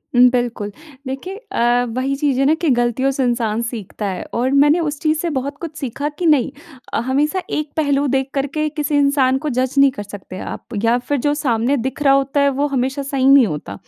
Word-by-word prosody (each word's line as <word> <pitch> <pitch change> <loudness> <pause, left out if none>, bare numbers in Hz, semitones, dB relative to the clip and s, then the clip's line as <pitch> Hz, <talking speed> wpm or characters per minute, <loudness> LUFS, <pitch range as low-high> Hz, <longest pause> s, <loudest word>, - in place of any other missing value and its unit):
उम, 250 +1 +7
बिल्कुल। 240 -4 -2 0.4
देखिए 270 +9 -5 0.2
अ, 245 -7 +2
वही 265 +2 0
चीज़ 275 -2 0
है 275 - +3
ना 295 - +4
कि 335 - +2
गलतियों 240 +1 +1
से 270 0 -1
इंसान 235 -3 0
सीखता 225 -3 -5
है 190 -2 -4
और 250 +3 0
मैंने 290 +4 +4
उस 295 -3 -2
चीज़ 310 0 +1
से 340 - -1
बहुत 280 -1 -3
कुछ 325 -3 -6
सीखा 280 +2 -3
कि 355 - -1
नहीं 300 -6 +3 0.4
अ, - - +1
हमेशा 295 +8 +1
एक 300 -1 -3
पहलू 285 -2 +1
देख 265 0 0
कर 275 0 0
के 305 +2 -2
किसी 300 -1 -2
इंसान 280 -2 +3
को 300 - +1
जज 255 0 -1
नहीं 275 0 +6
कर 255 -6 -7
सकते 200 -2 -9
आप 240 - -7
या 230 +1 +3
फिर 285 +4 -2
जो 290 - +3
सामने 260 -2 0
दिख 265 +4 -4
रहा 275 -1 +5
होता 275 +1 +1
है, 280 - +4
वो 280 +2 0
हमेशा 270 0 -1
सही 275 -1 -1
नहीं 275 -4 +7
होता। 150 - -5
270 Hz, 225 wpm, -19 LUFS, 245-290 Hz, 0.4 s, उम